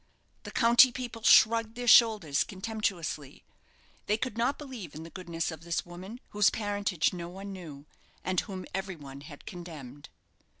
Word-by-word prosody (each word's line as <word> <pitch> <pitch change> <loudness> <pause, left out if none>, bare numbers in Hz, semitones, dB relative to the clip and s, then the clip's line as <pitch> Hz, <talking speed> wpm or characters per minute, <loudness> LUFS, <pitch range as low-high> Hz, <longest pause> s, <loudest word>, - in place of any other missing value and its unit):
The - - -5
county 240 +1 +6
people 240 -2 -6
shrugged 225 +1 +5
their 245 0 -4
shoulders 215 -11 +6
contemptuously. 190 -8 -4 0.6
They 210 - +2
could 250 -1 -3
not 235 +4 +1
believe 250 - -8
in 155 - -7
the 165 - -11
goodness 170 -3 -3
of 160 -1 -9
this 170 0 -2
woman, 185 +7 -9
whose 205 -1 +4
parentage 205 -6 0
no 170 -1 -6
one 195 +2 -8
knew, 155 -6 -9 0.4
and 185 -1 +1
whom 190 -3 -5
every 190 0 -3
one 140 -3 -10
had 145 0 -12
condemned. 150 -6 -9
190 Hz, 160 wpm, -29 LUFS, 165-225 Hz, 0.6 s, county